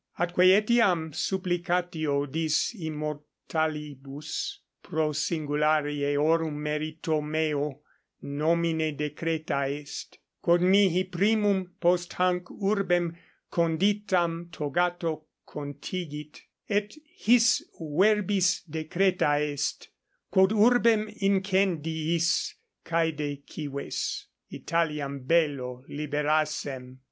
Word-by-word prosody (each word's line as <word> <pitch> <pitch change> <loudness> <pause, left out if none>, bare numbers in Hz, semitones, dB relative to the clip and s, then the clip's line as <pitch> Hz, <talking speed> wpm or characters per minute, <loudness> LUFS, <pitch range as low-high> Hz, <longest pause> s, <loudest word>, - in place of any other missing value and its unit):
Atque 175 +1 +3
etiam 200 -8 +2
supplicatio 175 -6 -1
dis 155 - 0
immortalibus 150 - -4 0.2
pro 155 -1 -1
singulari 150 -1 0
eorum 150 +2 +1
merito 155 +1 -2
meo 150 -2 -1 0.4
nomine 160 +1 0
decreta 150 -2 -2
est, 145 0 -7 0.2
quod 170 +1 +4
mihi 185 -1 +4
primum 195 0 +1
post 175 0 +2
hanc 180 0 +1
urbem 185 -5 0 0.4
conditam 175 0 +1
togato 165 +1 -1 0.2
contigit, 150 +1 -6 0.3
et 205 +2 -1
his 240 -6 +3 0.2
verbis 190 +3 +2
decreta 160 0 +1
est: 145 -1 -2 0.4
quod 190 0 +5
urbem 220 -1 +4
incendiis, 170 -4 +1 0.3
caede 150 -4 -1
cives, 140 -2 -4 0.2
Italiam 150 -4 -2
bello 130 -4 0
liberassem. 150 -3 -1
160 Hz, 75 wpm, -27 LUFS, 150-180 Hz, 0.4 s, quod